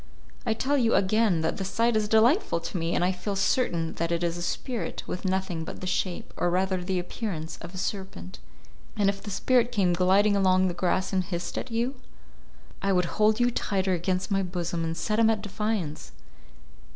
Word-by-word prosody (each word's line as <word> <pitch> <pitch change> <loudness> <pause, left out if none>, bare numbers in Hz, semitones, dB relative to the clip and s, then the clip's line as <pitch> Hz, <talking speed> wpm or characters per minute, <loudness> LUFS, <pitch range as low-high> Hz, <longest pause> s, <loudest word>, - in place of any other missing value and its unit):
"I 220 - +2
tell 280 +5 +1
you, 230 -2 +3
again, 200 -3 +3
that 160 - -1
the 195 - -3
sight 230 +4 +1
is 215 -1 +1
delightful 225 - +3
to 165 - -7
me, 165 -1 0
and 175 - +2
I 185 - +2
feel 195 +2 -4
certain 175 -5 +1
that 170 0 -1
it 170 0 0
is 170 -1 0
a 175 - -5
spirit 235 +7 -3
with 180 - -5
nothing 185 -3 -1
but - - -7
the - - -6
shape, 185 0 -2
or 175 - +1
rather 185 +1 0
the 185 +1 -1
appearance, 175 -3 -4
of 180 - -9
a - - -6
serpent." 185 - -5 0.6
"And 200 -2 +3
if 195 0 -3
the 210 - -7
spirit 245 +4 +2
came 195 -6 +2
gliding 190 +4 +4
along 185 -1 +3
the - - -3
grass 185 +2 0
and 185 -1 +2
hissed 175 -1 -4
at - - -4
you?" 235 +3 0 0.9
"I 195 - +1
would 180 +3 0
hold 215 +1 +4
you 245 0 +3
tighter 190 -4 0
against 185 +2 -1
my 195 0 +2
bosom, 175 -2 -2
and 165 0 -2
set 215 +7 0
him 225 -1 +5
at 215 -2 0
defiance. 200 - -3
190 Hz, 205 wpm, -27 LUFS, 175-215 Hz, 0.9 s, him